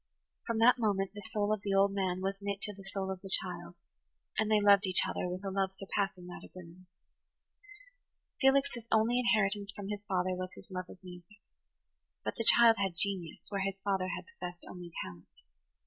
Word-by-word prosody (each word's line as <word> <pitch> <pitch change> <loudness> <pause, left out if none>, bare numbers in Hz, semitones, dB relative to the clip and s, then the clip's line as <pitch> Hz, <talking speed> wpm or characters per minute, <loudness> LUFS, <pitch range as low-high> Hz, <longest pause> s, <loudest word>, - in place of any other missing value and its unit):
From 230 -2 0
that 245 +3 +6
moment 200 -4 +1
the 205 - -8
soul 210 -1 +1
of 215 - -2
the 200 -1 -1
old 195 0 +5
man 185 -2 -1
was 195 +1 -2
knit 200 0 -2
to 210 - -2
the 195 - -12
soul 190 -1 -2
of 190 -1 -6
the 195 - -8
child, 175 -2 -1 0.6
and 220 0 +1
they 215 -1 +5
loved 200 -1 +5
each 185 - +4
other 180 - -2
with 180 +2 -5
a 195 - -2
love 190 0 0
surpassing 195 -1 -3
that 180 - -9
of - - -12
women. 180 0 -12 1.5
Felix's 270 -3 +3
only 225 +3 +3
inheritance 205 -4 +1
from 200 0 -7
his 205 -1 -3
father 185 -1 +1
was 185 0 -3
his - - -14
love 185 -1 -5
of - - -11
music. 180 +3 -12 0.8
But - - -1
the 230 - -2
child 235 -1 +7
had 190 -3 0
genius, 185 -4 -1
where 200 -1 -2
his 195 0 -2
father 195 -2 0
had - - -4
possessed 180 - -8
only 175 -1 -9
talent. 90 -1 -11
195 Hz, 195 wpm, -32 LUFS, 185-210 Hz, 1.5 s, child